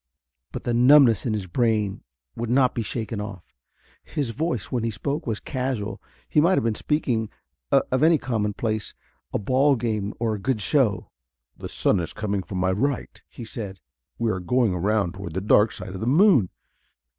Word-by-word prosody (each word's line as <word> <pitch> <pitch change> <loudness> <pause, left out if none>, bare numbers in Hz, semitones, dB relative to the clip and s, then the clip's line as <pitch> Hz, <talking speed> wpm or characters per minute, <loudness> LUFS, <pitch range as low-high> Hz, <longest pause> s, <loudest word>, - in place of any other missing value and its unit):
But - - -6
the 120 - -1
numbness 125 -2 +6
in 110 - 0
his 105 -3 -2
brain 105 +1 0 0.3
would 115 0 -4
not 130 +1 +3
be 115 - -2
shaken 110 -1 -3
off. 100 -4 -7 0.6
His 140 -6 -3
voice, 150 -2 -3
when 120 -3 -1
he 115 - 0
spoke, 140 +8 -3
was 110 -2 -1
casual. 125 -6 -3 0.3
He 150 - +3
might 175 +4 +4
have - - +1
been 115 -1 +1
speaking 115 -4 -1 0.4
of 130 +1 +2
any 160 +1 +5
commonplace 110 -3 -2 0.4
a - - 0
ball 130 +7 +3
game, 110 -4 -2
or 115 -1 0
a 105 - -4
good 115 +3 -1
show. 105 - +1 0.4
"The - - -8
sun 100 - +2
is 85 - -4
coming 100 -2 -2
from 95 +1 -6
my 95 +1 +1
right," 135 +8 -2
he 120 - -9
said. 100 -4 -7 0.4
"We 115 -1 0
are 95 - -2
going 115 +2 +1
around 100 0 0
toward 95 -4 -8
the - - +1
dark 105 +2 +4
side 95 -2 -7
of 95 - -7
the 110 - -2
moon. 145 - +5
110 Hz, 185 wpm, -24 LUFS, 100-130 Hz, 0.6 s, numbness